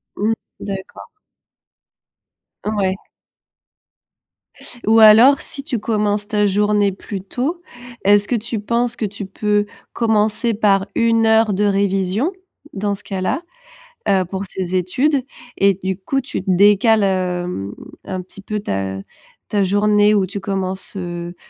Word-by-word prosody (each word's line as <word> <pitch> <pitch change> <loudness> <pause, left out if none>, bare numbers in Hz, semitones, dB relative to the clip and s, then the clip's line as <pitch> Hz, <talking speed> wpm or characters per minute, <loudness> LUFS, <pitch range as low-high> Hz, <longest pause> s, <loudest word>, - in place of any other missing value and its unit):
Mmh. 215 +3 +1 0.3
D'accord. 195 -1 -7 1.6
Ouais. 200 -3 0 1.9
Ou 225 +1 +5
alors 225 +6 +8
si 275 - -6
tu 250 -5 -2
commences 210 -1 -1
ta 210 -1 +1
journée 205 0 +2
plus 195 +1 -7
tôt, 270 - -3 0.4
est-ce 205 +1 +4
que 245 - 0
tu 225 0 -3
penses 235 +3 -1
que 220 - -1
tu 200 0 -6
peux 205 +2 0 0.3
commencer 220 +1 +1
par 200 -2 +2
1 230 -1 +3
heure 220 -1 +4
de 205 - 0
révision? 200 - +1 0.4
Dans 205 +1 -1
ce 195 - -11
cas-là, 195 - -2 0.7
heu, 190 -2 +3
pour 190 +2 -5
tes 185 -1 -4
études 255 - +1 0.4
et 200 -1 +4
du 190 0 -1
coup 270 +8 -1
tu 265 - -5
te 190 - -3
décales, 205 +4 +5
hem, 180 - -2 0.3
un 185 -1 -4
petit 185 +2 -14
peu 210 +2 -4
ta 95 - -3 0.5
ta 205 -1 +1
journée 205 +2 +3
où 200 -2 +2
tu 200 +2 -6
commences, 190 -1 -4
heu, 175 -1 -5
205 Hz, 135 wpm, -19 LUFS, 190-220 Hz, 1.9 s, alors